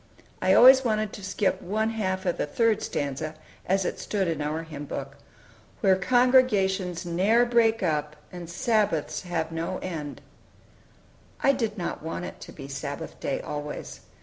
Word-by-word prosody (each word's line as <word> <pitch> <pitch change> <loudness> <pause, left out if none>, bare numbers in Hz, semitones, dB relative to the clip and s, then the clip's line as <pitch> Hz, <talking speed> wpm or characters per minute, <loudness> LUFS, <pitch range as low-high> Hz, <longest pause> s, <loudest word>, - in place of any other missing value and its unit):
I - - +4
always 265 +1 +8
wanted 215 -3 0
to 200 - -9
skip 195 0 0
one 215 +4 -1
half 190 -3 -2
of 175 - 0
the - - 0
third 225 +6 +2
stanza, 145 +2 -3 0.3
as 190 0 +2
it - - -3
stood 195 -3 -1
in 160 -3 -2
our 155 +2 -2
Hymn 150 -3 -8
Book: 140 0 -6 0.7
"Where 190 -2 +5
congregations 195 -6 +2
ne'er 200 +8 +3
break 230 -3 +3
up, 150 -3 -1 0.2
And 175 -2 -8
Sabbaths 200 -4 0
have 170 -3 -3
no 165 +3 -3
end." 155 -6 -5 1.2
I 275 - +6
did 225 -5 -2
not 175 - -4
want 165 +3 -4
it - - -9
to - - -9
be 135 -2 -9
Sabbath 140 +3 -6
day 135 - -2
always. 150 0 -6
185 Hz, 160 wpm, -26 LUFS, 160-215 Hz, 1.2 s, always